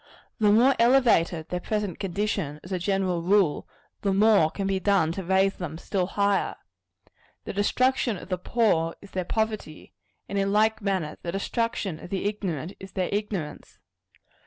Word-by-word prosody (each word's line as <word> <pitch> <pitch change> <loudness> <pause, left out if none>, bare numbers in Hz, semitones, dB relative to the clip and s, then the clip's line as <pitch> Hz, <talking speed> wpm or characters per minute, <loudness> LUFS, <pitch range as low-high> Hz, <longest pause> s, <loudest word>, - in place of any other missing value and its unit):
The 210 -2 +4
more 245 +6 +5
elevated 230 -10 +3
their 180 - -2
present 205 -2 -3
condition, 195 -5 -2
as 180 - -11
a 185 - -1
general 185 -2 0
rule, 185 -3 +2 0.3
the 200 - +1
more 200 -4 +5
can 195 +4 -4
be 195 -1 0
done 190 -4 +2
to 190 +3 -5
raise 190 +2 +2
them 160 -4 -6
still 180 +1 -2
higher. 200 0 +1 0.9
The - - -6
destruction 240 +2 +1
of 180 - -11
the 185 -1 -1
poor, 180 -6 +1
is 200 - -13
their 185 -1 -2
poverty; 215 -7 -3 0.3
and 200 - -2
in 195 0 +1
like 215 +1 +2
manner, 190 -7 -2
the 170 - -4
destruction 195 -3 -2
of - - -10
the 195 0 -3
ignorant, 190 -5 -3
is 190 0 -11
their 185 -1 -1
ignorance. 200 -7 -4
195 Hz, 165 wpm, -26 LUFS, 175-210 Hz, 0.9 s, more